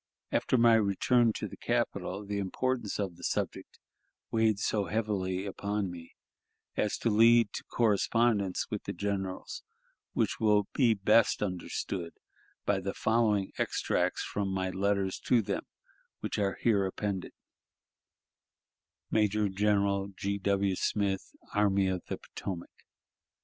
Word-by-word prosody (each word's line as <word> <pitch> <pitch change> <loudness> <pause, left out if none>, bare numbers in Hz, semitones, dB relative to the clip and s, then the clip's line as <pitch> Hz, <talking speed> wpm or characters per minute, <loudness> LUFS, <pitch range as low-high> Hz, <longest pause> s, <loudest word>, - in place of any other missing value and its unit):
After 130 - +2
my 115 -1 +6
return 115 +3 +3
to - - -4
the - - -10
capital, 100 +3 -2
the 100 0 -2
importance 120 +3 -1
of 95 -4 -3
the 90 - -14
subject - - -3 0.5
weighed 110 -2 +3
so 105 0 0
heavily 95 -2 -1
upon 100 -1 -2
me 85 -1 -11 0.6
as 105 - 0
to 115 - 0
lead 115 +1 +5
to - - -5
correspondence 110 -2 +2
with - - -4
the - - -3
generals, 95 -2 -3 0.5
which - - 0
will 105 -2 +3
be 120 -5 +4
best 105 +2 +3
understood 90 -2 -3 0.5
by 100 -1 +2
the 95 +1 -4
following 110 -3 +2
extracts - - 0
from 100 -1 -2
my 95 -1 -1
letters 100 0 0
to 125 - +4
them - - -3 0.5
which - - -3
are 100 -2 0
here 105 -4 +3
appended: 95 -1 -3 1.8
"Major 105 -1 +2
General 100 0 +1
G. 100 0 -2
W. 100 0 +1
Smith, 100 0 -1 0.2
Army 100 -2 +3
of 95 -1 -1
Potomac. 90 -3 -6
100 Hz, 130 wpm, -30 LUFS, 95-110 Hz, 1.8 s, my